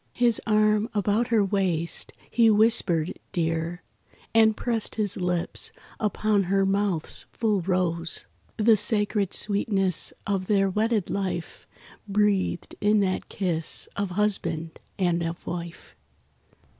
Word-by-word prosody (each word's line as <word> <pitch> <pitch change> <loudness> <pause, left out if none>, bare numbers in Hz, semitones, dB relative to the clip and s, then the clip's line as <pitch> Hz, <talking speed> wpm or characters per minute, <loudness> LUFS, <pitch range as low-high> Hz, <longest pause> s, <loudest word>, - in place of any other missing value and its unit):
His 240 -2 +2
arm 215 +1 +3
about 210 +3 +1
her 220 -3 +3
waist, 185 -4 -1 0.2
he 230 -1 +5
whispered 205 -7 +2
"Dear," 165 +1 -2 0.5
And 220 -1 +5
pressed 230 -3 -1
his 205 -3 -1
lips 180 -2 0 0.3
upon 210 -1 +1
her 195 +2 +2
mouth's 195 -4 -1
full 215 -4 +1
rose— 170 -2 0 0.3
The 225 0 +5
sacred 210 -1 +1
sweetness 200 -3 +1
of 195 -2 -1
their 195 -2 +2
wedded 215 -1 0
life 185 -4 -4 0.4
Breathed 200 -3 0
in 210 +1 +4
that 185 -1 -1
kiss 170 -5 -2
of 200 -1 -2
husband 165 -6 -1 0.2
and 175 -2 +1
of 165 +1 -4
wife. 170 -1 -7
200 Hz, 120 wpm, -26 LUFS, 175-215 Hz, 0.5 s, he